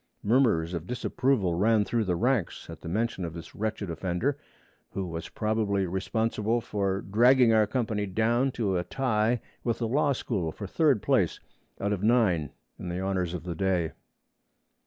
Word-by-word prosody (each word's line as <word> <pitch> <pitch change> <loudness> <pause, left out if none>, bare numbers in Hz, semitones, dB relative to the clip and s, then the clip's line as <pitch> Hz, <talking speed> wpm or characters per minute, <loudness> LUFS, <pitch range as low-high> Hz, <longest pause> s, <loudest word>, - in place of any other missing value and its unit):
Murmurs 105 -8 +3
of 85 0 -4
disapproval 125 -4 0
ran 105 +4 +3
through 115 -1 0
the 90 -2 0
ranks 120 -1 -1
at - - -10
the - - -6
mention 110 0 -1
of 85 -1 -5
this 85 -1 -9
wretched 110 -1 -3
offender, 90 - -1 0.5
who 95 - -3
was 85 -1 -6
probably 105 -3 0
responsible 110 +4 0
for 100 -3 -1
dragging 120 +3 +5
our 110 -1 +4
company 110 -3 -1
down 115 +7 +2
to 100 -5 0
a - - -2
tie 120 0 +1 0.2
with 115 -2 0
the 115 - -1
Law 145 +4 +2
School 100 -10 -2
for 100 - -7
third 135 - +2
place - - +2 0.4
out 100 +1 0
of 95 - -3
nine 105 - +3 0.3
in 90 - -5
the 90 +1 -3
honors 95 -2 -1
of 85 - -6
the 90 -1 -4
day. 90 -1 0
105 Hz, 170 wpm, -28 LUFS, 90-115 Hz, 0.5 s, dragging